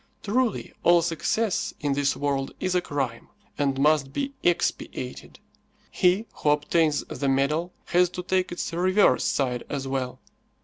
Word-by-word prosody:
Truly, 230 +1 0
all 175 -1 +5
success 180 +5 -1
in 145 -2 0
this 140 0 +1
world 140 -1 -2
is 185 - -1
a 180 - +2
crime, 135 -8 -3 0.3
and 140 -2 0
must 145 -1 +3
be 280 - -3
expiated. 145 -6 -2 0.5
He 185 +5 +2
who 150 - +1
obtains 150 +1 +2
the 140 - -3
medal 150 +6 +1
has 180 0 +3
to 180 - -3
take 185 0 0
its 175 -1 -4
reverse 185 +4 +3
side 125 -3 0
as 135 -2 -3
well. 130 -2 -3
155 Hz, 145 wpm, -25 LUFS, 140-180 Hz, 0.5 s, all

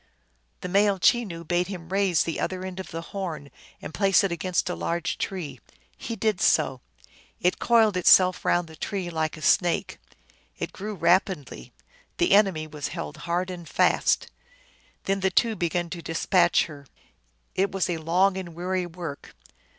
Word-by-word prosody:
The - - -4
male 200 +2 +3
Chenoo 185 -4 +1
bade 175 +2 0
him 180 -4 -8
raise 195 -3 +2
the 165 - -3
other 185 0 -3
end 190 0 -6
of 190 - -7
the 165 +1 -6
horn 160 -8 -5 0.3
and - - -7
place 195 +5 +3
it 195 - 0
against 175 +2 -1
a 180 - -1
large 170 0 -2
tree. 155 -10 -4 0.4
He 230 - -6
did 215 -3 0
so. 130 -2 +2 0.6
It 180 - +1
coiled 225 -4 +4
itself 185 0 +5
round 175 -1 +1
the 160 - -12
tree 185 0 -4
like 160 -1 -2
a 155 - -10
snake, 175 -4 +2 0.6
it - - -5
grew 210 +2 -6
rapidly; 180 -4 0 0.5
the 350 - +2
enemy 195 -6 +4
was 150 -2 -5
held 75 -2 -6
hard 180 +2 0
and 175 -2 -9
fast. - - +2 0.8
Then 195 0 0
the 190 0 +1
two 225 +4 +2
began 175 -1 -1
to 175 - -5
dispatch 170 +2 +2
her. 145 -3 -12 0.7
It 195 +1 0
was 195 -1 0
long 175 +3 +1
and 175 -3 -7
weary 180 +1 -2
work. 165 -4 -8
180 Hz, 165 wpm, -25 LUFS, 165-195 Hz, 0.8 s, itself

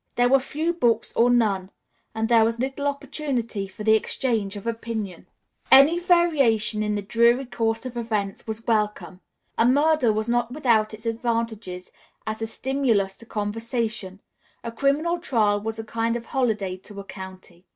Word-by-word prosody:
There 245 0 +3
were 270 +1 +5
few 310 +5 -2
books 235 -8 +1
or 240 +1 +4
none, 205 -6 +2 0.5
and 220 0 0
there 230 -1 +5
was 230 +1 0
little 270 +3 -2
opportunity 260 -7 -3
for 190 +2 -9
the 220 0 +5
exchange 220 -2 0
of 205 - -8
opinion. 225 -5 -4 0.4
Any 290 +6 +7
variation 285 - +3
in 210 0 0
the 205 - -3
dreary 235 +5 +3
course 225 -1 -2
of 255 -1 -6
events 215 -4 -3
was 220 +1 -6
welcome. 210 -5 -1 0.4
A 230 - +5
murder 285 -2 +3
was 215 +1 -2
not 240 0 0
without 230 -6 +1
its 215 +2 -15
advantages 225 -5 -3 0.3
as 220 0 -4
a 225 - -1
stimulus 230 -6 0
to 230 - -14
conversation; 220 -2 -3 0.4
a 230 - -4
criminal 290 +8 +1
trial 215 -10 +1
was 220 +1 -4
a 225 - -5
kind 230 +1 -1
of 235 -1 -5
holiday 215 -8 -1
to 200 +2 -11
a - - -6
county. 190 -2 -11
230 Hz, 165 wpm, -24 LUFS, 210-250 Hz, 0.5 s, Any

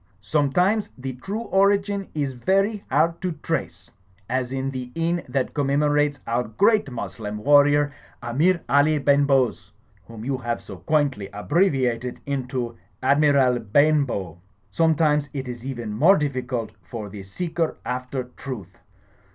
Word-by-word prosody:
Sometimes 180 - +1
the 130 0 -5
true 195 - -5
origin 200 -1 +1
is 140 -3 -1
very 195 - +1
hard 165 +5 +2
to 180 -2 -1
trace; - - -3 0.4
as 130 0 -1
in 135 0 -2
the 125 -2 -6
inn 170 +1 0
that 135 -2 -1
commemorates 145 0 +1
our 120 +1 0
great 205 - +2
Moslem 105 -2 -5
Warrior, 145 +3 +4 0.3
Amir 160 +9 +1
Ali 145 +2 +4
Ben 140 0 +3
Bhoze, 130 -4 +1 0.4
whom 115 -1 -9
you 135 -1 -1
have 120 -1 -2
so 100 - -10
quaintly 140 - 0
abbreviated 125 - 0
into 125 -4 -3 0.2
Admiral 140 -3 +4
Ben 145 +7 +3
bow. 95 - -5 0.3
Sometimes 150 -1 +2
it 135 -2 -4
is 120 -1 -7
even 120 -5 -4
more 165 - +5
difficult 125 -6 -2
for 105 +4 -7
the 100 0 -8
seeker 160 - -3
after 125 +1 -3
truth. 120 -7 -9
135 Hz, 135 wpm, -24 LUFS, 120-155 Hz, 0.4 s, more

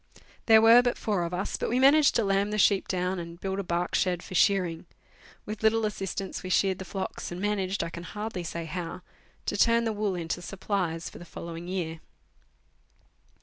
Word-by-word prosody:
There 220 -1 +7
were 230 +2 +8
but 245 -1 0
four 205 -5 -1
of 170 - -4
us, 180 +3 -2
but - - -2
we 245 - +1
managed 280 +3 +5
to 230 - +3
lamb 195 0 +1
the 210 - -2
sheep 200 -1 +3
down 180 0 -1
and 170 0 -7
to - - -31
build 195 0 -3
a - - -2
bark 175 0 -2
shed 180 -2 +1
for - - -9
shearing. 180 -3 +2 0.6
With 215 0 -6
little 220 0 +3
assistance, 195 -2 -4
we 185 - -6
sheared 190 0 +2
the 190 - -6
flocks, 190 0 -5
and 175 - -5
managed, 195 -2 -1
I 170 - -5
can 170 - -7
hardly 210 0 -5
say 170 0 -5
how, 165 +2 -5 0.4
to - - -1
turn 230 +3 +4
the 225 -1 -1
wool 205 -2 -1
into 170 0 -3
supplies 180 -3 -3
for - - -10
the - - -9
following 170 0 -8
year. 170 -3 -3
190 Hz, 205 wpm, -28 LUFS, 175-210 Hz, 0.6 s, were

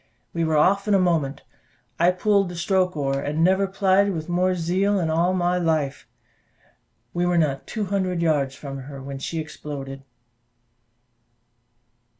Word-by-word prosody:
We 170 - -1
were 160 -1 +1
off 195 +6 +3
in 205 - +4
a - - +4
moment: 165 -7 0 0.6
I 170 +1 +5
pulled 195 +1 +2
the 175 - -7
stroke 180 0 +1
oar, 135 -1 0
and 145 +2 -3
I - - +1
never 190 +2 +3
plied 195 +1 +2
with 155 -2 -5
more 180 +1 +1
zeal 185 +4 +1
in 160 -3 0
all 170 +3 +2
my 180 0 +1
life: 155 -5 -1 1.1
we 175 - 0
were 175 -1 +2
not 145 -4 0
two 215 -3 -3
hundred 185 -2 -1
yards 145 -5 +1
from 135 -2 -7
her 135 +1 -9
when 135 0 -7
she 165 - -4
exploded. 140 -3 -7
170 Hz, 160 wpm, -23 LUFS, 150-185 Hz, 1.1 s, I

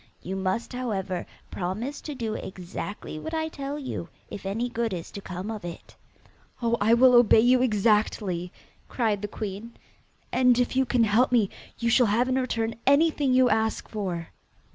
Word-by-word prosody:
You 190 +2 -4
must, 190 +6 -2
however, 195 -8 -3 0.2
promise 215 +11 -4
to 295 - -6
do 230 -4 -3
exactly 185 -3 -6
what 320 - -5
I 315 0 -1
tell 280 -1 -5
you, 260 - -5 0.2
if 195 - -6
any 225 +5 -1
good 235 -3 -2
is 170 -2 -6
to 200 - -7
come 185 +3 -5
of 215 -4 -6
it.' 170 -1 -9 0.6
'Oh, 235 -1 +1
I 225 +3 +5
will 255 +1 +6
obey 240 -2 +7
you 250 +2 +4
exactly,' 210 -5 +1 0.4
cried 220 -5 0
the 205 - -3
queen, 210 +2 -6 0.6
'and 250 -2 +4
if 245 +1 0
you 265 -1 +2
can 245 -3 +3
help 225 +4 +3
me 225 -6 +3 0.3
you 235 0 0
shall 245 0 +5
have 230 +5 +2
in 260 0 +1
return 230 -3 -2
anything 285 -1 +4
you 255 0 +5
ask 220 0 0
for. 180 -6 -4
225 Hz, 175 wpm, -26 LUFS, 195-250 Hz, 0.6 s, obey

